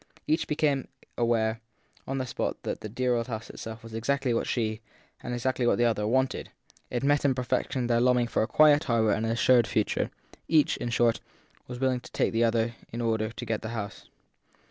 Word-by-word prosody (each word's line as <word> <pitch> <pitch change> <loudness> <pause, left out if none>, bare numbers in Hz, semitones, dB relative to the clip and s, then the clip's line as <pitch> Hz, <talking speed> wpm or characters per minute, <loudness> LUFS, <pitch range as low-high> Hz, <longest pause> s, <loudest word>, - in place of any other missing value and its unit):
Each 155 - +1
became 150 -3 +1 0.3
aware 115 -1 +1 0.5
on 135 - -2
the 130 - -1
spot 120 - -3
that - - -4
the 110 - -6
dear 125 +3 0
old 115 0 -1
house 115 -2 -5
itself 110 0 -8
was 115 -1 -10
exactly 130 +3 0
what 115 - 0
she, 110 -2 -1 0.4
and - - -5
exactly 120 0 0
what - - +3
the 120 - +3
other, 105 -3 +1
wanted; 130 +2 0 0.4
it 125 +1 -2
met 145 +1 +3
in 135 -2 +3
perfection 125 0 -1
their 120 -1 +2
longing 125 -1 +3
for 120 - 0
a 110 - +1
quiet 150 +2 +5
harbour 115 -3 +2
and 110 +2 0
an - - 0
assured 120 +1 +4
future; 110 - 0 0.4
each, 155 -2 +3
in 120 - -3
short, 115 0 +2 0.5
was 125 -1 -7
willing 130 -1 +1
to - - -14
take - - +1
the 115 +1 +2
other 115 0 +1 0.2
in 115 - -5
order 110 -2 0
to 120 +2 -7
get 110 -1 -2
the 110 - -5
house. 100 -2 -6
120 Hz, 210 wpm, -28 LUFS, 115-130 Hz, 0.5 s, quiet